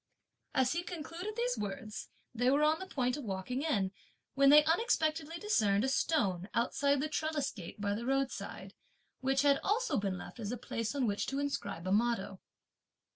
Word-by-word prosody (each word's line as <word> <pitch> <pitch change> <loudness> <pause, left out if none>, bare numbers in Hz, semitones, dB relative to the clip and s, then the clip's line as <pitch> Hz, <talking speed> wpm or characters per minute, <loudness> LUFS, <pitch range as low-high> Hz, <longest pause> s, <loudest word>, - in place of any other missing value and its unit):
As 260 -1 +3
he 340 - 0
concluded 350 +4 -6
these - - 0
words, 215 +2 -5 0.2
they 245 +1 +2
were 285 +3 +3
on 310 +1 +3
the 380 - -6
point 250 -5 0
of 290 - -6
walking 205 +5 -3
in, 205 -12 +1 0.4
when 275 0 +5
they 300 +1 +9
unexpectedly 320 -3 +1
discerned 215 - +2
a - - +2
stone, 200 - +1
outside 280 +4 +2
the 305 - 0
trellis 310 -2 -1
gate, 185 -1 -9
by 200 0 0
the 235 +4 -4
roadside, 270 0 -2 0.5
which 270 +1 +1
had 280 -1 +4
also 460 - +1
been 195 -2 -2
left 210 - -9
as 210 -1 -3
a 245 - -3
place 230 +1 -3
on 270 -3 +1
which 205 -2 -1
to 275 - -2
inscribe 200 -11 -3
a - - 0
motto. 205 -3 +1
270 Hz, 180 wpm, -33 LUFS, 210-310 Hz, 0.5 s, they